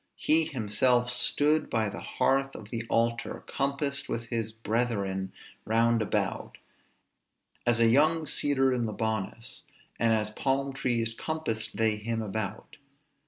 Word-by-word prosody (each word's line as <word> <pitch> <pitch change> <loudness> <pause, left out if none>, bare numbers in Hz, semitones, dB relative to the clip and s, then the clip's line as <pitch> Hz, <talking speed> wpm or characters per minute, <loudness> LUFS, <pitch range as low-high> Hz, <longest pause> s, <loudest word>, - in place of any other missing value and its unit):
He 160 +1 +4
himself 125 0 +1
stood 150 +5 +3
by 110 -1 +1
the 100 - -6
hearth 135 0 0
of 105 -1 -10
the 115 -1 -3
altar, 115 0 0
compassed 140 0 -2
with 115 0 -3
his 115 -2 -2
brethren 105 -4 -2 0.3
round 115 +1 +2
about; 105 - -2 1.1
as 120 -1 +3
a 115 - +5
young 155 +6 +3
cedar 135 -3 +2
in 120 -2 0
Libanus, 110 +1 -4 0.3
and 115 -1 +3
as 105 -1 +1
palm 135 +4 -1
trees 120 -4 -1
compassed 115 -8 -3
they 110 -1 +2
him 115 +2 -3
about. 105 -1 -5
115 Hz, 130 wpm, -28 LUFS, 110-135 Hz, 1.1 s, a